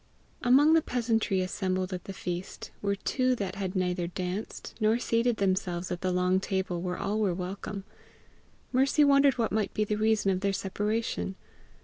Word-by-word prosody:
Among 280 +6 +5
the 325 - +5
peasantry 225 -7 0
assembled 185 0 -2
at 180 - -5
the - - -6
feast, 180 0 -5
were 200 0 0
two 255 +5 +1
that 195 -5 -3
had 195 -1 -4
neither 180 -1 0
danced, 180 +3 -5
nor 220 +1 +3
seated 235 -1 +1
themselves 185 -2 -1
at 175 - -3
the 185 - 0
long 180 +1 +2
table 190 -2 -2
where 180 0 -3
all 210 +2 -1
were 195 -5 +1
welcome. 195 +2 -5 0.9
Mercy 270 +4 +4
wondered 280 -2 +5
what 230 -2 0
might 215 -1 -1
be 215 - +2
the 210 0 -1
reason 215 -2 +2
of 185 - 0
their 200 0 0
separation. 205 +1 -2
200 Hz, 170 wpm, -29 LUFS, 185-225 Hz, 0.9 s, Among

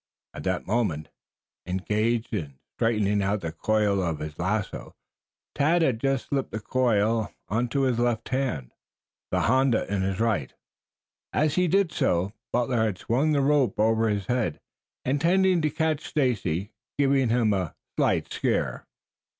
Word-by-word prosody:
At - - -8
that 95 -1 -1
moment, 95 -9 -1 0.6
engaged 110 +6 0
in 75 -10 -4 0.2
straightening 105 -3 +1
out 100 +1 0
the 80 - -3
coils 105 +3 +1
of 85 -3 -1
his 75 0 -7
lasso, 105 +4 -2 0.6
Tad 165 +4 +3
had 125 -7 +1
just 135 0 0
slipped 135 -2 -2
the 110 - -4
coil 110 -3 +1 0.2
into 120 +5 0
his 125 -3 +1
left 120 -2 0
hand, 125 - -2 0.6
the - - +1
honda 130 -3 +3
in 100 - 0
his 95 +1 -1
right. 110 - 0 0.8
As 150 -1 +1
he 180 0 +2
did 195 0 +2
so 90 +4 0 0.2
Butler 120 -1 +1
had 105 -5 -2
swung 135 +11 +1
the 140 - +3
rope 140 -4 +2
over 110 +1 +3
his 100 -2 -1
head, 120 -8 -1 0.5
intending 175 +6 +3
to 155 - +1
catch 155 0 -1
Stacy, 105 - 0 0.3
giving 135 -3 +3
him 115 -2 +3
a 95 -5 -2 0.2
slight - - +1
scare. - - -1
115 Hz, 150 wpm, -26 LUFS, 100-135 Hz, 0.8 s, Tad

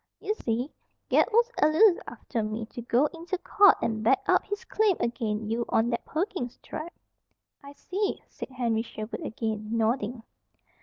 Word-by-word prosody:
"Ye 420 - -1
see, 245 - -2 0.4
Ged - - +5
was 470 +2 +3
allus 340 +6 +6
after 235 - -4
me 215 +1 -3
to 240 - -8
go 240 +4 +3
inter 340 +3 -4
court 405 +2 +5
an' 220 -1 -1
back 235 +4 +3
up - - +4
his 410 0 -5
claim 420 -4 +2
ag'in 220 -3 -2
you 230 +2 0
on 230 +2 +2
that 235 - -2
Perkins 320 - -3
Tract." 335 +3 -7 0.7
"I 280 0 -10
see," 395 +7 -3
said - - -8
Henry 235 -4 0
Sherwood 220 -1 -6
again, 220 -1 -3
nodding. 225 +1 0
245 Hz, 160 wpm, -28 LUFS, 225-345 Hz, 0.7 s, allus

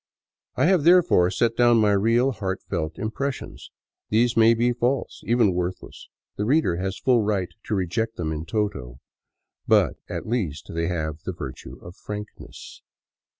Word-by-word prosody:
I - - +2
have, 180 -3 +3
therefore, 170 - +5
set 115 +4 0
down 120 0 +4
my 105 -2 +3
real, 115 +6 +2
heartfelt 95 -7 -4
impressions. 135 +5 -5 0.4
These 115 +2 +2
may 115 0 +5
be 120 +2 +1
false, 125 +3 -2
even 115 -5 +3
worthless; 90 +1 -5 0.3
the 105 - -1
reader 130 - +2
has 95 +1 -3
full 125 -3 +2
right 100 -4 -1 0.2
to 105 - -1
reject 110 +5 -2
them 80 -3 -3
in 80 0 -4
toto. 70 - -3 0.7
But - - +3
at - - -5
least 95 - -3
they 85 0 -1
have 80 -3 -3
the 95 - -5
virtue 70 -7 -8
of 85 +1 -10
frankness. 105 0 -9
105 Hz, 150 wpm, -24 LUFS, 90-120 Hz, 0.7 s, therefore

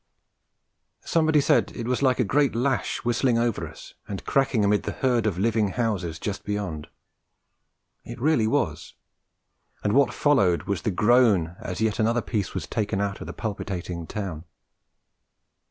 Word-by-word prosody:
Somebody 160 -2 +3
said - - +2
it 115 - -4
was 125 0 0
like 130 -2 +2
a - - +4
great 135 +4 +2
lash 125 -2 -1
whistling 120 0 +2
over 115 -2 0
us - - -12
and 100 -2 -6
cracking 135 -6 +2
amid 105 +1 +3
the - - -4
herd 120 -4 +1
of 95 -5 -1
living 110 +1 +2
houses 100 -9 -1
just 100 +2 -4
beyond. 100 -7 -4 1.2
It 120 - -9
really 130 -5 +2
was; 105 - -1 0.9
and 105 - +1
what 140 +2 +4
followed 115 - +2
was 100 -4 -2
the - - -1
groan 105 -5 +3
as 90 - -5
yet 110 +1 0
another 115 +2 +2
piece 105 -5 -3
was - - -3
taken 100 -2 -2
out 100 -1 -2
of - - -7
the - - -5
palpitating 90 -5 -5
town. 90 -6 -5
110 Hz, 155 wpm, -25 LUFS, 100-125 Hz, 1.2 s, a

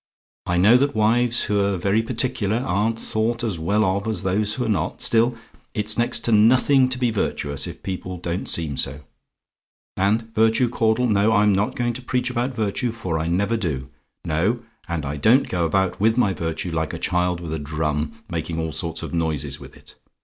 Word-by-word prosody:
I 90 - +1
know 105 +7 +6
that 140 +2 0
wives 115 +2 +2
who're 100 -1 +1
very 100 +5 +1
particular 115 -3 -1
aren't 110 -1 0
thought 115 +1 -1
as 105 -8 -2
well 100 +6 +1
of 100 +3 -1
as 110 -5 -2
those 105 +3 0
who're 125 -2 -2
not 105 -3 -1
still, 115 +1 +3 0.4
it's 105 -1 +1
next 120 0 0
to 115 - -1
nothing 130 +5 +5
to 130 - -1
be 125 -2 +1
virtuous, 70 -9 -2
if - - -9
people 95 -1 -5
don't 85 +1 -4
seem 80 -5 -1
so. 70 +2 -1 0.9
And 110 +4 0
virtue, 115 +3 +3
Caudle 115 +1 +1
no, 105 -1 +3
I'm 105 -1 +4
not 100 +3 0
going 120 -1 -1
to 125 - -7
preach 125 0 -1
about 125 +2 -2
virtue, 110 +3 -1
for 95 -8 -3
I 80 - -2
never 100 +7 +1
do. 70 -10 -3 0.4
No; 100 +10 0 0.3
and 85 -4 -2
I 70 +2 -3
don't 115 - +4
go 85 -2 0
about 95 +2 0
with 110 +2 +3
my 100 -6 +3
virtue, 80 +1 -3
like 80 -1 -2
a - - -3
child 90 0 0
with 85 -2 -5
a 80 - -2
drum, 75 +7 -3
making 85 -2 -4
all 80 -1 -2
sorts 80 +1 -2
of - - -6
noises 75 -4 -2
with - - -13
it. - - -17
105 Hz, 195 wpm, -22 LUFS, 85-115 Hz, 0.9 s, know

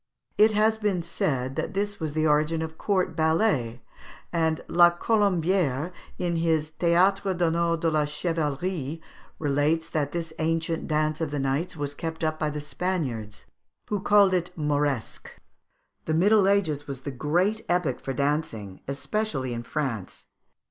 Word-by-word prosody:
It 215 +1 +6
has 220 +1 +3
been 200 -5 0
said 135 -6 -1
that - - -3
this 205 +1 -1
was 155 -2 -3
the 155 0 +1
origin 155 +2 +2
of 160 0 -6
court 195 -3 0
ballets, 160 - +1 0.6
and 160 -2 +1
La 175 0 +6
Colombière, 180 - +1 0.3
in 170 -1 -1
his 160 -2 +1
"Théâtre 185 +4 +2
d'Honneur 170 0 +2
et 165 - -8
de 155 -3 +2
Chevalerie," 155 0 -2 0.4
relates 150 +3 0
that 145 -2 -1
this 165 -2 -4
ancient 165 0 -1
dance 155 0 0
of 160 - -1
the 145 - -3
knights 140 +6 -1
was 145 -1 -3
kept 160 +2 -5
up 155 0 0
by 155 - 0
the 150 0 -4
Spaniards, 145 - -3 0.4
who 210 - 0
called 200 -1 +5
it 180 -1 0
the 160 - -6
Moresque. 145 -4 -1 0.8
The 155 - 0
Middle 200 +3 +4
Ages 160 -8 +1
was 135 -2 -6
the 140 - -5
great 175 - 0
epoch 175 -8 +1
for 135 - -4
dancing, 140 -8 -2
especially 140 - -2
in 115 - -4
France. 120 -6 -4
160 Hz, 155 wpm, -26 LUFS, 145-180 Hz, 0.8 s, It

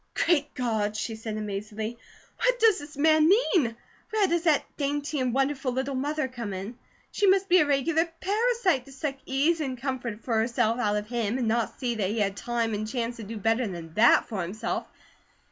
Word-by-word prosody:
"Great 300 -4 +2
God!" 220 -5 -1
she 225 +1 -3
said 220 -1 -5
amazedly. 210 +2 -4 0.4
"What - - +2
does 445 -4 +5
the 290 0 -10
man 310 +1 +5
mean? 355 - +3 0.3
Where 435 -2 +2
does 345 -1 +1
that 310 -3 +4
dainty 290 +1 -2
and 255 -1 0
wonderful 270 0 0
little 265 +2 -2
mother 290 +2 -1
come 235 -6 -6
in? 200 +6 -7 0.3
She 405 - +1
must 385 0 +4
be 365 0 +6
a 300 - +3
regular 305 +4 +2
parasite, 410 - +1
to 275 - -14
take 270 - -14 0.2
such - - -30
ease 305 +5 +2
and 265 -4 -3
comfort 245 -4 -4
for 240 - -2
herself 230 0 +1
out 210 -4 +1
of 210 0 -2
him, 235 0 -1
and 245 -3 -1
not 230 +1 -1
see 245 -2 -1
that 205 -5 -1
he 215 - -2
had 200 -2 0
time 235 0 -1
and 215 +1 -2
chance 235 0 -3
to 225 - -7
do 220 +2 -6
better 225 +3 +1
than 170 -4 -7
THAT 225 +5 +5
for 205 -4 -3
himself. 185 +6 -3
250 Hz, 205 wpm, -27 LUFS, 220-300 Hz, 0.4 s, be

